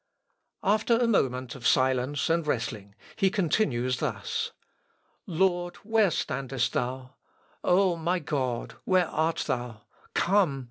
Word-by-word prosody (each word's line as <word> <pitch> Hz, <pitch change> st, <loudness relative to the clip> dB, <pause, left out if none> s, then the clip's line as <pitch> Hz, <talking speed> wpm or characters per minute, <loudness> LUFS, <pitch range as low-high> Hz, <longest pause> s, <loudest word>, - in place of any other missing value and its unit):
After 215 Hz, +3 st, +3 dB
a 240 Hz, -, +2 dB
moment 130 Hz, -, +1 dB
of 125 Hz, -3 st, -2 dB
silence 130 Hz, +2 st, +2 dB
and 165 Hz, -1 st, +1 dB
wrestling, 110 Hz, -7 st, -3 dB, 0.2 s
he 195 Hz, -3 st, +3 dB
continues 150 Hz, -, +1 dB
thus: -, -, -2 dB, 0.8 s
"Lord, 175 Hz, 0 st, +1 dB
where 220 Hz, -2 st, +3 dB
standest 135 Hz, -4 st, -2 dB
thou?... 130 Hz, +1 st, -3 dB, 0.5 s
O, 185 Hz, -1 st, +3 dB
my 170 Hz, +3 st, 0 dB
God, 130 Hz, -6 st, -2 dB
where 185 Hz, -2 st, +3 dB
art 160 Hz, +1 st, 0 dB
thou?... 120 Hz, -3 st, -3 dB, 0.3 s
Come! 180 Hz, -7 st, +2 dB
150 Hz, 120 wpm, -27 LUFS, 125-185 Hz, 0.8 s, After